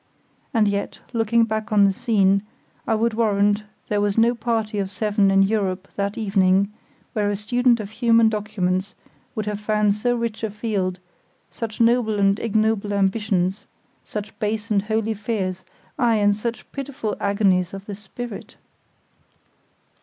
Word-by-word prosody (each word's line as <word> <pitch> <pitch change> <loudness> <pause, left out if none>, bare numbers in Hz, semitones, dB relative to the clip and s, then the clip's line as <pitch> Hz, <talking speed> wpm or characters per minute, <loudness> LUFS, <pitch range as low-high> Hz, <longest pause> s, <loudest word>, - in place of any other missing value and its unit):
And 220 -2 +3
yet, 200 0 -2 0.2
looking 230 0 +3
back 220 0 -2
on 205 -1 +5
the 195 - +3
scene, 200 -4 +2 0.5
I 225 - +2
would 225 +1 +1
warrant 205 -1 +2 0.2
there 205 -1 0
was 205 0 0
no 230 +2 +5
party 225 -3 -1
of 195 -1 -2
seven 205 -2 +2
in 195 0 +5
Europe 195 -2 -1
that 200 0 -2
evening 195 -1 +2 0.4
where 205 -1 +1
a 205 - 0
student 240 +3 +2
of 210 -1 -6
human 230 0 +4
documents 205 -3 -1 0.4
would 215 - -2
have 210 -1 -3
found 210 -1 +2
so 245 +4 0
rich 230 -2 -3
a 220 - 0
field, 200 -4 -2 0.5
such 225 -2 -6
noble 230 -2 +3
and 200 +1 +3
ignoble 215 -2 +1
ambitions, 195 -1 0 0.4
such 210 0 -6
base 215 +1 -2
and 200 -2 +3
holy 220 +1 -1
fears, 200 -4 -3 0.4
aye, 235 -3 +3
and 205 -1 +3
such 230 +2 -5
pitiful 275 -6 -4
agonies 195 -3 +2
of 195 0 -8
the 205 - -6
spirit. 210 +3 -8
210 Hz, 155 wpm, -23 LUFS, 200-225 Hz, 0.5 s, on